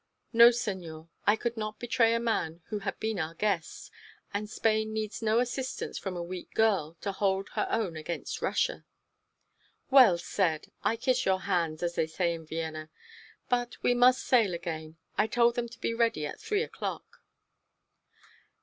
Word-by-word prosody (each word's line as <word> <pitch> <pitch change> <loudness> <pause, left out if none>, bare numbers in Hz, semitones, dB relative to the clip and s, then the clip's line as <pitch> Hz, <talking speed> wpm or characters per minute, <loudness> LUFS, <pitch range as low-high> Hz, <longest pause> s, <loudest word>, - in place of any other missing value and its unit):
"No, 235 +1 +9
senor, 180 -9 -4 0.2
I 205 - +6
could 235 +1 -3
not 215 0 -4
betray 235 -1 +2
a - - +1
man 175 -8 -1
who 210 - -2
had 195 -1 -4
been 220 -3 -2
our 160 0 -3
guest, 190 -4 -2 0.4
and 205 +1 -3
Spain 220 0 +1
needs 215 0 -3
no 220 0 +2
assistance 255 +2 -3
from 190 -2 -4
a 175 - -3
weak 180 +1 -8
girl 195 -8 +2
to 200 - -2
hold 195 0 0
her - - -1
own 195 -7 -1
against 155 +2 -5
Russia." - - 0 1.1
"Well 255 -10 +8
said! 170 -3 -1
I 225 - +2
kiss 255 +2 +1
your 190 0 +2
hands, 170 -4 -1
as 170 0 0
they 160 - 0
say 170 +1 0
in 165 -1 -8
Vienna. 160 -1 -4 0.6
But 245 -1 -1
we 245 - +4
must 250 +1 +5
sail 220 -8 +3
again. 160 -2 -6 0.2
I 210 - +4
told 235 +1 +3
them 235 0 -3
to 230 0 -14
be 230 - -1
ready 230 -10 +1
at - - -6
three 430 0 0
o'clock." - - -6
210 Hz, 170 wpm, -29 LUFS, 170-235 Hz, 1.1 s, No